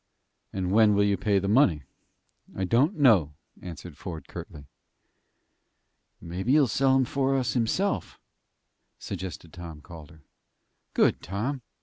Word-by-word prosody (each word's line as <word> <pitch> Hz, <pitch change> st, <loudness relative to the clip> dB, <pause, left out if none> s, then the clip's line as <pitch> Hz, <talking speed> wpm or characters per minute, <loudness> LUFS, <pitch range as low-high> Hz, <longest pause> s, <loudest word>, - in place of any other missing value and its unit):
"And 95 Hz, -1 st, -2 dB
when 105 Hz, 0 st, +5 dB
will 100 Hz, -, +3 dB
you 100 Hz, -1 st, +2 dB
pay 100 Hz, +1 st, +1 dB
the 95 Hz, 0 st, 0 dB
money?" 100 Hz, -, +3 dB, 0.7 s
"I 95 Hz, -, -2 dB
don't 130 Hz, -, +2 dB
know," 100 Hz, -, +4 dB, 0.3 s
answered 90 Hz, -2 st, -9 dB
Ford, 80 Hz, -6 st, -7 dB
curtly. 70 Hz, -1 st, -9 dB, 1.5 s
"Maybe 95 Hz, +9 st, -2 dB
he'll 150 Hz, -2 st, +6 dB
sell 135 Hz, +3 st, +2 dB
'em 130 Hz, -1 st, +3 dB
for 135 Hz, +1 st, 0 dB
us 125 Hz, -4 st, -1 dB
himself," 130 Hz, -, -1 dB, 0.8 s
suggested 90 Hz, -3 st, -7 dB
Tom 85 Hz, -3 st, -9 dB
Calder. 80 Hz, -1 st, -13 dB, 0.7 s
"Good, -, -, +3 dB
Tom! 115 Hz, -, -3 dB
100 Hz, 125 wpm, -27 LUFS, 85-130 Hz, 1.5 s, he'll